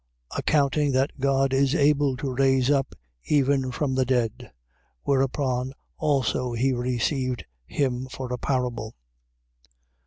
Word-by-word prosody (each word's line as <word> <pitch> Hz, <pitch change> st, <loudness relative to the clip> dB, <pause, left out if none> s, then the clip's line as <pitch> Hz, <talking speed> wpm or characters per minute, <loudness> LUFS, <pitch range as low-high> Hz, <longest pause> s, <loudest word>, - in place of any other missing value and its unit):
Accounting 145 Hz, -1 st, +2 dB
that 135 Hz, +2 st, 0 dB
God 135 Hz, 0 st, +2 dB
is 135 Hz, +2 st, +3 dB
able 145 Hz, -3 st, +3 dB
to 135 Hz, 0 st, -3 dB
raise 135 Hz, 0 st, +3 dB
up 135 Hz, -2 st, 0 dB, 0.3 s
even 140 Hz, -2 st, +2 dB
from 135 Hz, +1 st, -1 dB
the 130 Hz, 0 st, +2 dB
dead. 125 Hz, -3 st, -1 dB, 0.5 s
Whereupon 130 Hz, -1 st, 0 dB, 0.2 s
also 130 Hz, -3 st, 0 dB
he 130 Hz, +3 st, +1 dB
received 125 Hz, -1 st, -1 dB, 0.2 s
him 130 Hz, -2 st, -1 dB
for 130 Hz, -1 st, -6 dB
a -, -, -1 dB
parable. 125 Hz, -5 st, -2 dB
130 Hz, 120 wpm, -25 LUFS, 125-140 Hz, 0.5 s, is